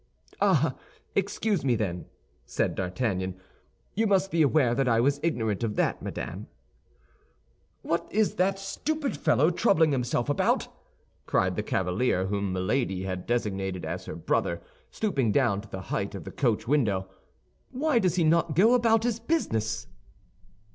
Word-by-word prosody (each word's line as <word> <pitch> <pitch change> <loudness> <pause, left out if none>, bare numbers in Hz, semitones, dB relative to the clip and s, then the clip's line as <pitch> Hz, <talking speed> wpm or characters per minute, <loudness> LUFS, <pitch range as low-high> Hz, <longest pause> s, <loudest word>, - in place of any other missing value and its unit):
"Ah, - - +3 0.4
excuse 200 -2 0
me, 125 -3 +2
then," 90 -5 -3 0.4
said - - -1
D'Artagnan. 95 -1 -2 0.5
"You 220 +2 +1
must 195 -1 +2
be 165 - +2
aware 140 -4 +3
that 135 +1 +1
I 115 -2 +3
was 140 +4 +2
ignorant 115 - -1
of 105 -2 -1
that, - - 0
madame." - - -6 1.4
"What 170 +1 -2
is 215 0 +2
that 190 +2 +2
stupid 280 - -3
fellow 145 +3 +3
troubling 170 -5 +3
himself 120 -2 0
about?" 145 - +1 0.6
cried - - +1
the - - -1
cavalier 95 +1 0
whom 100 0 -1
Milady 95 +1 -1
had 95 -1 -4
designated 95 -6 -2
as 90 +3 -5
her - - -6
brother, 85 +1 0 0.3
stooping 140 - 0
down 115 -6 +2
to 105 - -15
the 95 - -6
height 100 +1 -2
of 95 - -7
the - - -8
coach 115 -4 0
window. 105 -9 +1 0.6
"Why 270 0 +1
does 185 -4 +1
not 170 0 +3
he 155 - -4
go 205 - +5
about 225 -2 +3
his 235 -2 0
business?" 115 - -1
125 Hz, 150 wpm, -27 LUFS, -, 1.4 s, go